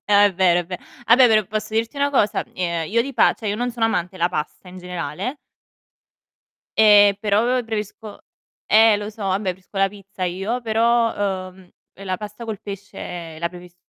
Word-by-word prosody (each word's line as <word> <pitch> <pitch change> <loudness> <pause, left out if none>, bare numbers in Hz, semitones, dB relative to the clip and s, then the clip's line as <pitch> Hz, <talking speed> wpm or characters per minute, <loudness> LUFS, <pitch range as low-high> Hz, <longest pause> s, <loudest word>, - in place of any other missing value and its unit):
È 205 -1 +5
vero, 175 -1 +3
è - - -6
ve 180 -1 -6 0.3
vabbè 245 +2 +7
però, 215 -2 +4
posso 215 0 -4
dirti 225 +5 -1
una 285 0 +1
cosa? 210 -7 +1
Ehm, 170 -3 -2
io 230 +2 +3
di 275 +2 -6
pa - - +4
cioè 215 - -5
io 205 - -1
non 245 +2 -1
sono 235 -1 -1
amante 180 -4 -2
la 175 -1 +1
pasta 165 +2 -5
in 185 +1 -10
generale 180 - -5 1.4
e 205 -2 +7
però 210 0 +2 0.2
preferisco 215 -1 -6 0.5
eh 220 0 +6
lo 210 +1 -5
so, 215 0 -10
vabbè, 190 +1 0
preferisco 185 +2 -17
la 195 0 +3
pizza 195 -1 -11
io, 195 +7 -2
però, 220 -4 +1
ehm, 185 -1 -18 0.4
la 185 -1 -2
pasta 210 +3 -8
col 220 -3 -5
pesce 180 -5 -8
la 170 - 0
preferisco 180 0 -14
205 Hz, 180 wpm, -21 LUFS, 185-220 Hz, 1.4 s, vabbè